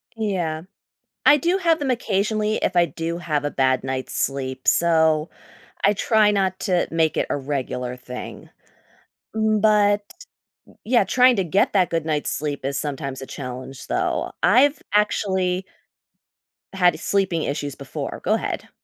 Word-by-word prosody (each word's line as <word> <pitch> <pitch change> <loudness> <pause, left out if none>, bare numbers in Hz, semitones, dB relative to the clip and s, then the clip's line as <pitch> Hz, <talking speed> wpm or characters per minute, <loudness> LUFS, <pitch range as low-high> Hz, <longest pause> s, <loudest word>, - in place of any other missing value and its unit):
Yeah. 180 -8 -2 0.6
I 295 - +7
do 345 +6 +1
have 335 -3 +2
them 275 -3 0
occasionally 215 -2 0
if 185 - -1
I 175 -1 +5
do 170 0 -4
have 155 -4 -1
a 145 - -1
bad 130 -1 +1
night's 130 0 -4
sleep, 130 -1 -3
so 160 -2 +3 0.6
I 200 - +5
try 210 +1 +3
not 190 -2 0
to 180 -2 +1
make 160 -1 +1
it - - +1
a - - +1
regular 130 -3 -3
thing. 125 0 -9 0.9
Mm, 215 -1 +1
but 205 -1 +4 0.8
yeah, 235 -1 +3
trying 250 +5 +5
to 195 - +2
get 190 +4 +1
that 185 -3 +3
good 165 -2 -1
night's 150 -2 -1
sleep 145 -2 -3
is 140 0 -1
sometimes 140 -2 -4
a - - -6
challenge, 130 0 -8
though. - - -1
I've 275 +7 +4
actually 190 -3 +1 1.1
had 180 -4 +3
sleeping 190 -4 0
issues 145 -1 -3
before. 140 -2 -6
Go - - +2
ahead. - - -4
175 Hz, 150 wpm, -22 LUFS, 145-210 Hz, 1.1 s, I